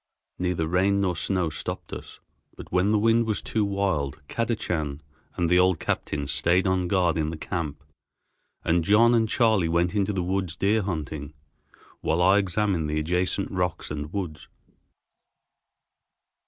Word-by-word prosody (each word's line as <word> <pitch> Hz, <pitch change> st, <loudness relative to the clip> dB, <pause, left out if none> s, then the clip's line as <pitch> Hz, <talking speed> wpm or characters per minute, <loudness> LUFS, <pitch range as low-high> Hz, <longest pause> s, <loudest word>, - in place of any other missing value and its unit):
Neither 90 Hz, -3 st, 0 dB
rain 95 Hz, +4 st, +2 dB
nor 90 Hz, -3 st, 0 dB
snow 90 Hz, -1 st, 0 dB
stopped -, -, -6 dB
us, -, -, -9 dB, 0.4 s
but -, -, -11 dB
when 90 Hz, +3 st, +2 dB
the 110 Hz, -, +4 dB
wind 115 Hz, +2 st, +3 dB
was 110 Hz, -, 0 dB
too 110 Hz, -, -1 dB
wild, 100 Hz, -9 st, -1 dB
Kadachan 85 Hz, -11 st, -2 dB, 0.4 s
and 85 Hz, -, 0 dB
the 90 Hz, +2 st, +4 dB
old 90 Hz, -3 st, +3 dB
captain 70 Hz, -1 st, -2 dB
stayed 85 Hz, +7 st, +2 dB
on 95 Hz, -1 st, +1 dB
guard 85 Hz, -3 st, +2 dB
in 75 Hz, -1 st, 0 dB
the 80 Hz, -, -5 dB
camp 80 Hz, -3 st, -4 dB, 0.8 s
and 85 Hz, 0 st, +2 dB
John 110 Hz, +6 st, +5 dB
and 115 Hz, -2 st, +2 dB
Charley 110 Hz, -8 st, +3 dB
went 85 Hz, +2 st, +1 dB
into 105 Hz, -1 st, +1 dB
the 95 Hz, -3 st, -1 dB
woods 95 Hz, -2 st, -2 dB
deer 105 Hz, +3 st, +2 dB
hunting, 75 Hz, -5 st, -4 dB, 0.6 s
while 80 Hz, -, 0 dB
I 95 Hz, +3 st, +5 dB
examined 95 Hz, -4 st, 0 dB
the 75 Hz, +1 st, 0 dB
adjacent 90 Hz, +5 st, -1 dB
rocks 90 Hz, -5 st, -2 dB
and 75 Hz, 0 st, -5 dB
woods. 90 Hz, -7 st, -5 dB
90 Hz, 155 wpm, -26 LUFS, 80-100 Hz, 0.8 s, John